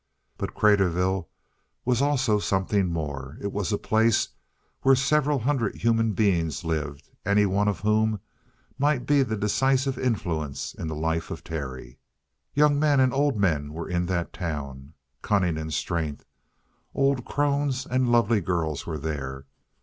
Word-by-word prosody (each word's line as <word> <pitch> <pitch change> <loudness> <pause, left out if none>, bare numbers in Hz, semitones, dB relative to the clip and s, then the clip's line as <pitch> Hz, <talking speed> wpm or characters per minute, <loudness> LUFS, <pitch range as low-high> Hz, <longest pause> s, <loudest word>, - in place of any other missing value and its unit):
But - - -5
Craterville 95 -3 +2 0.6
was 125 0 +2
also 135 -7 +2
something 95 0 +1
more. 70 -4 -4
It 100 - -3
was 100 -4 -2
a 105 - +1
place 110 +1 +2 0.5
where 135 0 +5
several 145 +2 +2
hundred 125 -3 0
human 115 -1 +1
beings 90 -7 +1
lived, 75 -3 -3
any 100 +2 +3
one 100 +1 +1
of 105 - -1
whom 110 0 +2 0.6
might 140 -3 +2
be 145 +1 +4
the 110 -4 -1
decisive 130 +5 +1
influence 80 - -2
in 80 - -6
the 80 - -3
life 80 +1 -1
of - - -6
Terry. 65 -5 -6 0.6
Young 145 0 +4
men 145 -2 +3
and 130 -1 +4
old 140 -2 +2
men 75 -7 0
were 85 +1 -5
in 90 -1 -1
that 85 -2 -2
town, 75 -4 -5 0.3
cunning 90 -5 +1
and 80 0 -4
strength; 80 0 -2 0.7
old 135 -2 +2
crones 140 -2 0
and 130 -1 +1
lovely 115 -2 +3
girls 80 -4 -2
were 80 -2 -3
there. 70 -3 -4
100 Hz, 150 wpm, -26 LUFS, 80-125 Hz, 0.7 s, where